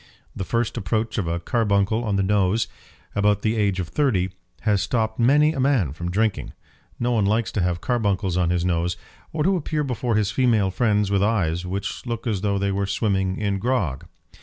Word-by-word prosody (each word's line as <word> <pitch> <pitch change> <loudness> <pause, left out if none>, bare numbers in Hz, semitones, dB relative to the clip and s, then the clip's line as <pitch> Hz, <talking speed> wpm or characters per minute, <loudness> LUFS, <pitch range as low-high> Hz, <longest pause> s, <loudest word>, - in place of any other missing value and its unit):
The - - -3
first 115 +4 -1
approach 110 +2 -1
of 90 - -2
a 85 +1 -1
carbuncle 105 +2 +1
on 105 -3 -1
the 100 - +2
nose, 100 +2 +2 0.5
about 105 0 +2
the 110 +1 +1
age 100 -3 +1
of 90 - -3
thirty, 100 -11 +1 0.3
has 105 -3 +2
stopped 110 +1 -1
many 145 +6 +4
a 135 - -4
man 130 - +2
from 85 +3 -4
drinking. 105 +3 -1 0.5
No 120 +1 0
one 110 -4 +2
likes 110 0 +1
to 100 - -1
have 90 -1 0
carbuncles 100 -6 0
on 90 -2 +2
his 90 0 0
nose, 85 0 0 0.3
or 155 -1 -1
to 190 +4 +3
appear 155 -3 -1
before 125 -3 -1
his 105 -1 +1
female 110 -5 +2
friends 105 -1 +1
with 100 -1 +2
eyes 90 -5 0
which 100 +2 -4
look 115 0 -4
as 105 -6 -1
though 100 -1 0
they 100 0 0
were 100 0 -1
swimming 95 -2 0
in 100 -2 -1
grog. 105 - -1
105 Hz, 200 wpm, -23 LUFS, 95-115 Hz, 0.5 s, many